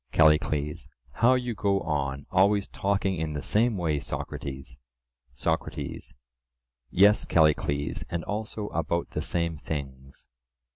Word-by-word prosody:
CALLICLES: 75 -1 +2 0.2
How 120 - +4
you 125 -1 -1
go 100 -2 +1
on, 70 -2 -2
always 100 +2 +3
talking 95 -1 0
in 80 -1 -2
the 75 - -3
same 110 - +2
way, 80 -5 0
Socrates! 65 -2 -6 0.6
SOCRATES: 80 0 -3 0.7
Yes, 100 +3 +5
Callicles, 75 -3 +2
and 85 -1 -3
also 105 0 -4
about 85 +1 -2
the - - -2
same 85 -2 -1
things. 70 -4 -7
80 Hz, 115 wpm, -27 LUFS, 70-100 Hz, 0.7 s, Yes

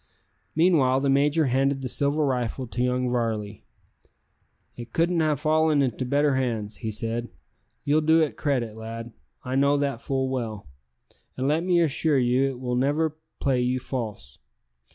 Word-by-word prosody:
Meanwhile 145 -6 +3
the 140 -1 +2
major 145 +3 +3
handed 135 +1 +1
the - - -2
silver 145 +4 +1
rifle 125 -1 -2
to 120 +1 -4
young 125 0 0
Varley. 110 -4 -2 1.1
"It 120 -1 -10
couldn't 170 0 +2
have 155 -3 +1
fallen 155 -1 +3
into 130 0 -2
better 145 +2 +2
hands," 115 -5 -2
he 110 - -4
said. 115 +2 -3 0.5
"You'll 150 +2 +2
do 160 +1 +4
it 155 -3 +1
credit, 125 -7 -1
lad, 115 +1 -7 0.3
I 130 - -3
know 140 +2 +3
that 140 -4 -2
full 135 -1 -1
well; 115 - -4 0.7
and 130 +1 -1
let 155 +3 +1
me 180 -1 +3
assure 155 -1 +2
you 125 +1 +2
it 135 -2 -3
will 125 -1 -2
never 145 +5 +1 0.2
play 130 -3 +1
you 125 +1 0
false. 110 - -6
130 Hz, 160 wpm, -25 LUFS, 120-145 Hz, 1.1 s, do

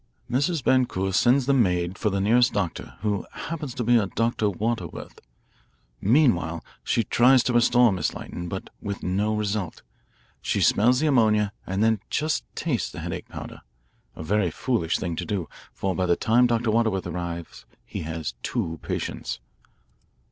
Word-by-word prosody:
Mrs. 145 +4 +1
Boncour 95 -8 +1
sends 125 +6 +4
the 140 - +3
maid 90 -7 +1
for 105 - 0
the 100 -1 -1
nearest 120 +5 +4
doctor, 100 -5 -3
who 105 -2 -1
happens 150 -6 -5
to 120 - -2
be 120 +1 +4
a 105 -3 +1
Dr. 115 0 0
Waterworth. 100 -2 -4 0.8
Meanwhile 95 - +2 0.2
she 115 - +1
tries 125 +4 +5
to 125 - 0
restore 120 0 +5
Miss 95 - -1
Lytton, 85 0 -6
but 95 - -6
with 100 -1 -5
no 100 +4 0
result. 105 -4 -3 0.6
She - - 0
smells 125 +5 +4
the - - +2
ammonia 110 -7 +3
and 95 +3 0
then 110 -1 +3
just 155 +1 0
tastes 125 - -1
the - - -7
headache - - -5
powder, - - -8 0.5
a - - -7
very 100 +2 +1
foolish 95 -3 0
thing 85 -2 -3
to - - -2
do, 100 -6 -2 0.2
for 95 -1 -2
by 95 -1 0
the 85 - +4
time 120 +5 +3
Dr. 115 -1 +1
Waterworth 110 -4 +1
arrives 85 -6 -5 0.2
he - - -6
has 80 0 -4
two 80 -1 -3
patients." - - -4
105 Hz, 160 wpm, -25 LUFS, 90-120 Hz, 0.8 s, tries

